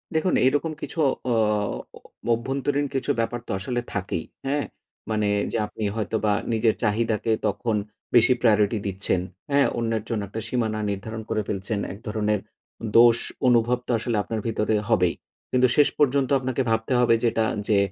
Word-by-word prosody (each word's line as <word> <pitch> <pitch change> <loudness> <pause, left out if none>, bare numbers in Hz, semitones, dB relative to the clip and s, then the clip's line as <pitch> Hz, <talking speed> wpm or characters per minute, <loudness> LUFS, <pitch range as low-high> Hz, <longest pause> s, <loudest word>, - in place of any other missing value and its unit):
দেখুন 170 +3 +2
এরকম 145 +4 +2
কিছু - - -7 0.3
অ - - +3 1.0
অভ্যন্তরীণ 135 +4 -1
কিছু 135 - 0
ব্যাপার 115 +1 -1
তো - - -4
আসলে 120 +5 -2
থাকেই। 95 -4 -3 0.2
হ্যাঁ? 145 +1 0 0.4
মানে 105 -1 +1 0.2
যে - - -1
আপনি 110 - -7
হয়তোবা 110 -1 0 0.2
নিজের 110 0 +2
চাহিদাকে 110 +1 +1 0.2
তখন 110 +2 -1 0.4
বেশি 120 +2 +6
প্রায়োরিটি 105 -2 +3
দিচ্ছেন। 95 -1 +1 0.3
হ্যাঁ? 140 0 +4
অন্যের 115 -2 -1
জন্য 115 -3 -1
একটা 110 +4 -5
সীমানা 110 -3 -1
নির্ধারণ 110 +3 -5
করে 110 -1 0
ফেলছেন। 100 +1 -2
এক 100 - -11
ধরনের 105 -1 0 0.6
দোষ 115 0 +8 0.3
অনুভব 120 0 +4
তো - - -1
আসলে 115 -2 -1
আপনার 110 - -3
ভিতরে 110 -1 0
হবেই। 90 -7 +3 0.4
কিন্তু 125 0 +4
শেষ 145 - +6
পর্যন্ত 140 -2 +3
আপনাকে 130 0 -1
ভাবতে 110 +3 0
হবে 120 -1 +4
যে 120 - +3
এটা 110 - +1 0.2
যে 105 - +3
115 Hz, 155 wpm, -24 LUFS, 105-125 Hz, 1.0 s, দোষ